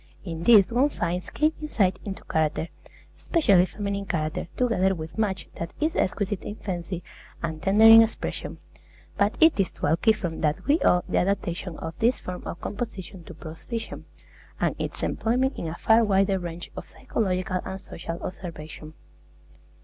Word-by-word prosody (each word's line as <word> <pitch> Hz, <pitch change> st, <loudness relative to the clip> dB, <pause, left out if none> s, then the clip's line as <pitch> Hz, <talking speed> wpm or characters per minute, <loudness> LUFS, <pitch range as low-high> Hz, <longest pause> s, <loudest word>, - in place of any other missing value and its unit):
In 165 Hz, -3 st, -5 dB
these 220 Hz, -2 st, +7 dB
one 265 Hz, +5 st, +4 dB
finds 175 Hz, -, -3 dB
keen 310 Hz, +1 st, +1 dB
insight 195 Hz, -11 st, +1 dB
into 195 Hz, -2 st, -6 dB
character, 160 Hz, +1 st, 0 dB, 0.5 s
especially 200 Hz, -, +4 dB
feminine 200 Hz, -1 st, -4 dB
character, 155 Hz, -2 st, -2 dB
together 190 Hz, -6 st, +2 dB
with 160 Hz, -1 st, -7 dB
much 205 Hz, -4 st, -1 dB
that 170 Hz, 0 st, -4 dB
is 315 Hz, +2 st, 0 dB
exquisite 205 Hz, +1 st, 0 dB
in 205 Hz, -, -6 dB
fancy 180 Hz, -3 st, -5 dB, 0.4 s
and 160 Hz, -1 st, -3 dB
tender 200 Hz, +3 st, +3 dB
in 225 Hz, 0 st, +11 dB
expression. 225 Hz, 0 st, -2 dB, 0.6 s
But 200 Hz, +2 st, +1 dB
it 320 Hz, -8 st, +5 dB
is 190 Hz, -, +2 dB
to -, -, -18 dB
Alciphron 170 Hz, +2 st, +1 dB
that 155 Hz, +4 st, 0 dB
we 295 Hz, +4 st, +3 dB
owe 180 Hz, 0 st, +4 dB
the -, -, +1 dB
adaptation 180 Hz, -2 st, -2 dB
of 160 Hz, -, -6 dB
this 240 Hz, +3 st, +2 dB
form 180 Hz, -1 st, -7 dB
of 170 Hz, -, -5 dB
composition 195 Hz, -5 st, -6 dB
to 175 Hz, -, -10 dB
prose 160 Hz, 0 st, -10 dB
fiction, 230 Hz, -2 st, -5 dB, 0.5 s
and -, -, +1 dB
its -, -, -4 dB
employment 255 Hz, +4 st, 0 dB
in 165 Hz, -, -3 dB
a 160 Hz, -, -4 dB
far 225 Hz, +5 st, +4 dB
wider 195 Hz, -2 st, +2 dB
range 175 Hz, -1 st, -7 dB
of -, -, -8 dB
psychological 185 Hz, -3 st, -1 dB
and 190 Hz, -, -5 dB
social 170 Hz, -2 st, -7 dB
observation. 160 Hz, -4 st, -8 dB
190 Hz, 165 wpm, -26 LUFS, 170-220 Hz, 0.6 s, in